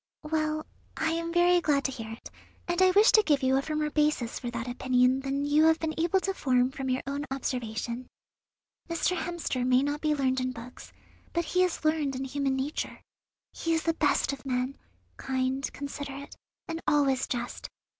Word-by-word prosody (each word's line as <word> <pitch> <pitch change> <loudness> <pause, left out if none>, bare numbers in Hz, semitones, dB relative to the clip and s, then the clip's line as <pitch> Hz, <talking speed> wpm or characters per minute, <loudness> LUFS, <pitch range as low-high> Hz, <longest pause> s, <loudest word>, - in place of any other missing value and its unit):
Well, 310 0 -1 0.3
I 320 0 +1
am 335 0 -2
very 350 +1 +4
glad 285 -4 +2
to 270 - +1
hear 225 -4 -7
it, 225 - -10 0.4
and 350 +1 0
I 375 - +7
wish 410 +5 +6
to 435 - +7
give 295 -8 +1
you 260 0 +3
a 270 - +3
firmer 305 0 -2
basis 300 -6 +1
for 245 - -4
that 235 0 -4
opinion 250 +1 +2
than 275 +1 -2
you 295 +2 +4
have 320 0 +5
been 320 -1 -2
able 340 +4 +2
to 390 - -1
form 255 -6 +2
from 270 -1 -4
your 255 0 0
own 280 +1 -3
observation. 245 -2 -3 0.8
Mr. 335 +2 +1
Hemster 335 -7 -2
may 255 +1 +4
not 290 +1 -2
be 305 -1 +2
learned 260 -2 +1
in 255 0 -2
books, 240 +1 -10 0.4
but 340 -1 0
he 365 +3 +1
is 360 -3 0
learned 310 -3 +1
in 260 - -3
human 270 0 -1
nature. 270 +3 -3 0.5
He 330 0 0
is 320 - -1
the 330 - +2
best 295 -3 +1
of 270 - -8
men, 255 0 -1 0.4
kind, 265 +1 -1
considerate, 280 0 -7 0.3
and 330 0 -4
always 275 -3 +3
just. 245 -1 -4
280 Hz, 190 wpm, -28 LUFS, 260-320 Hz, 0.8 s, I